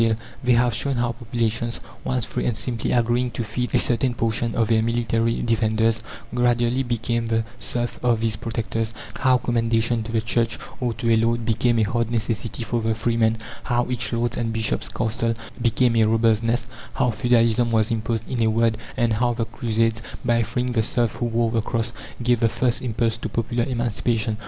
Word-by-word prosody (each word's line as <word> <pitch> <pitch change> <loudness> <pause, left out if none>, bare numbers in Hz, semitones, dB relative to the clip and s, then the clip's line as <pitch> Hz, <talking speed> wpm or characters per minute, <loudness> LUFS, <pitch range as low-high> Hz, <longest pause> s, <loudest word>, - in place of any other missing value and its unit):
They 125 0 +4
have 120 0 +3
shown 140 +5 -1
how 120 0 +1
populations, 115 -1 -2 0.2
once 125 -3 -1
free, - - -2
and 120 - -1
simply 120 -3 -2
agreeing 120 +1 +2
"to 120 - 0
feed" 120 +3 -2
a - - +6
certain 120 0 +1
portion 115 0 0
of 115 -2 +2
their 110 -1 +3
military 115 0 0
defenders, 110 -1 +1 0.3
gradually 120 +1 +2
became 115 -1 -1
the 115 0 +1 0.2
serfs 120 0 -3
of 120 -2 +2
these 110 -1 +1
protectors; 115 0 -3 0.3
how 130 -1 +4
"commendation" 115 -1 +1
to 110 +1 -6
the 115 - +2
Church, 115 0 0 0.2
or 120 -2 -1
to 115 0 +1
a - - +5
lord, 115 +1 +1
became 115 +1 +2
a 110 - +4
hard 115 +2 0
necessity 115 0 -2
for 115 +1 -1
the 110 0 0
freeman; 115 0 +1 0.3
how 120 -1 +1
each 120 0 -1
lord's 120 0 0
and 115 -1 -1
bishop's 110 -1 -1
castle 115 0 -1 0.3
became 120 +1 +2
a 110 -1 +5
robber's 110 0 +3
nest 115 +1 0 0.3
how 125 -2 +2
feudalism 115 +1 +3
was 110 -1 +2
imposed, 115 0 -2
in 125 -3 -2
a 110 - +4
word 115 0 +2 0.2
and 115 -1 +2
how 120 +2 +1
the 115 -1 -1
crusades, 115 0 0 0.2
by 115 0 +3
freeing 125 +3 -1
the 115 -2 +2
serfs 120 -1 0
who 120 - -1
wore 115 0 +1
the 115 -1 +1
cross, 115 +1 -2 0.3
gave 120 -1 +3
the 115 - +3
first 125 +1 +1
impulse 115 -2 0
to 115 - -5
popular 115 +2 -1
emancipation. 115 -2 -1
115 Hz, 190 wpm, -23 LUFS, 115-120 Hz, 0.3 s, a